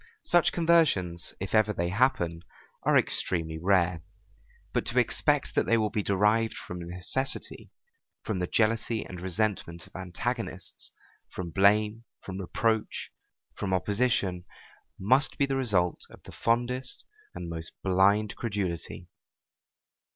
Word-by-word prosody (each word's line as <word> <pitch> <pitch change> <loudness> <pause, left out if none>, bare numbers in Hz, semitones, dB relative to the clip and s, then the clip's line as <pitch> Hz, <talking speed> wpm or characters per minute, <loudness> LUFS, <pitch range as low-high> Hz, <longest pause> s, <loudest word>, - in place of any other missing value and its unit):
Such 175 - +4
conversions, 150 - +2
if 95 -1 -5
ever 110 -1 +4
they 85 -2 -1
happen, 90 -6 +1 0.4
are - - +4
extremely 80 -2 +2
rare; 90 -2 +2 0.7
but - - +1
to - - -2
expect - - +2
that - - +1
they 115 - +4
will 105 -2 0
be 110 -2 0
derived 105 +3 +2
from 90 - -7
necessity, 90 +10 -2 0.5
from 105 -4 -2
the 90 - -1
jealousy 115 +1 +1
and 90 -1 -8
resentment 95 -3 -2
of - - -21
antagonists, 95 +2 -5 0.4
from 85 -2 -6
blame, 105 +5 +3 0.2
from 95 0 -6
reproach, 110 +4 -1 0.4
from 95 -2 -1
opposition, 100 -3 0 0.5
must 130 +8 +3
be 140 - +3
the 135 -1 -2
result 100 -10 +1
of - - -16
the - - -11
fondest 120 +2 -1 0.3
and 85 - -6
most 80 0 -6
blind 100 +3 +3
credulity. 100 -7 -4
100 Hz, 130 wpm, -28 LUFS, 90-115 Hz, 0.7 s, Such